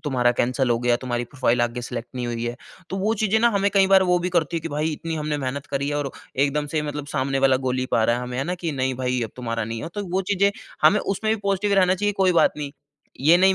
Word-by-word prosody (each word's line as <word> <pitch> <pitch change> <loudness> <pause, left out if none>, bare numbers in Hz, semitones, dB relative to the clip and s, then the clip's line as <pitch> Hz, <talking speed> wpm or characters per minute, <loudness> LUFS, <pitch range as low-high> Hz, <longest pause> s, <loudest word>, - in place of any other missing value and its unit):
तुम्हारा 125 -4 +2
कैंसल 125 +1 +1
हो 115 - +2
गया 120 0 +2
तुम्हारी 120 -1 -2
प्रोफाइल 125 -2 0
आगे 120 +1 -2
सेलेक्ट 120 0 -5
नहीं 125 -1 -3
हुई 120 -1 -3
है। 120 0 -3 0.3
तो 190 - -2
वो 210 +3 +1
चीज़ें 220 +1 +2
ना 235 - +5
हमें 200 -2 +1
कई 195 -1 +5
बार 195 0 +6
वो 180 -1 +3
भी 175 +1 -2
करती 165 0 +1
है 165 - -1
कि 165 - -5
भई 155 +1 -1
इतनी 165 +2 -4
हमने 150 -1 -2
मेहनत 135 +1 -4
करी 140 0 -2
है 145 - -1
और 140 -2 -2 0.3
एकदम 145 +1 -1
से 155 - +1
मतलब 150 -1 -5
सामने 135 -1 -1
वाला 135 -1 +4
गोली 130 0 0
पा 115 - +3
रहा 115 +1 +2
है 125 - -4
हमें 125 0 -5
है 135 - 0
ना 175 +4 -2
कि 165 -3 -1
नहीं 130 -1 -1
भई 125 0 -1
अब 110 - -4
तुम्हारा 115 -2 -3
नहीं 115 +1 -5
है। - - -4
तो 205 - -3
वो 190 - +2
चीज़ें 200 +1 +3 0.3
हमें 210 - +6
उसमें 215 +3 -1
भी 220 - -7
पॉज़िटिव 200 +1 +1
रहना 185 -1 +4
चाहिए 205 +2 0
कोई 185 - +4
बात 170 - +4
नहीं। 145 -2 -5 0.5
ये 160 +5 +6
नहीं 190 +1 +5
145 Hz, 280 wpm, -23 LUFS, 125-185 Hz, 0.5 s, बार